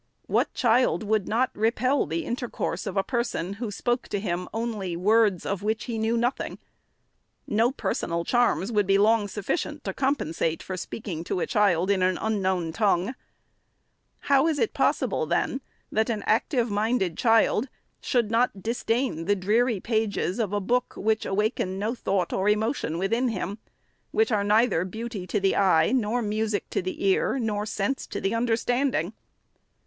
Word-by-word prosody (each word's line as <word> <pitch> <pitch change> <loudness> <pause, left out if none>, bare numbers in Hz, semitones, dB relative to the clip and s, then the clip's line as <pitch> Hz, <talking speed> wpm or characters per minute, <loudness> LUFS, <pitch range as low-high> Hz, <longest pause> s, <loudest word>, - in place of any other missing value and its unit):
What - - +1
child 240 -1 +2
would 215 -2 0
not 240 +4 +1
repel 240 - +1
the 165 +2 -2
intercourse 240 -2 -3
of 195 - -4
a 195 - +3
person, 235 -7 -2
who 235 - -2
spoke 240 +4 -1
to 205 - -2
him 180 -3 -3
only 215 -6 -3
words 205 0 +3
of 200 -1 -2
which 220 +2 -1
he 230 -2 -4
knew 225 +2 +1
nothing? 240 +3 -1 0.9
No 225 +4 +2
personal 170 -10 -2
charms 240 -4 +2
would 205 -3 +1
be 195 0 +4
long 210 +1 +3
sufficient 205 - -3
to - - -3
compensate 165 - -1
for 185 - -5
speaking 185 -3 -5
to 180 - -2
a - - 0
child 195 -3 +2
in 195 -2 +1
an 185 0 +2
unknown 190 -6 -1
tongue. 200 +2 +1 1.1
How 275 +2 +3
is 320 -2 +1
it 435 - 0
possible, 470 - +1
then, 265 - 0 0.3
that 220 +2 +1
an 220 -3 -2
active 235 +1 +1
minded 205 -4 0
child 225 +3 +3 0.3
should 235 -4 0
not 230 -4 +1
disdain 230 -5 -1
the 205 +2 +3
dreary 215 +4 +1
pages 220 -2 -1
of 215 -4 0
a 205 - 0
book 245 +5 0
which 220 +1 0
awaken 195 -2 -1
no 215 +4 -1
thought 195 -7 -1
or 195 +2 +1
emotion 215 - 0
within 230 +8 +1
him; 205 -2 -3 0.3
— - - -44
which 445 +1 +2
are 205 - +2
neither 210 -4 +3
beauty 215 0 -6
to 205 - 0
the 195 0 +2
eye, 185 -3 +4
nor 240 -1 +1
music 215 -1 -2
to - - 0
the 185 +2 -4
ear, 195 +7 +2
nor 210 -4 -1
sense 215 +5 -2
to - - -4
the 195 - -1
uaderstanding 245 +3 0
215 Hz, 170 wpm, -26 LUFS, 195-235 Hz, 1.1 s, be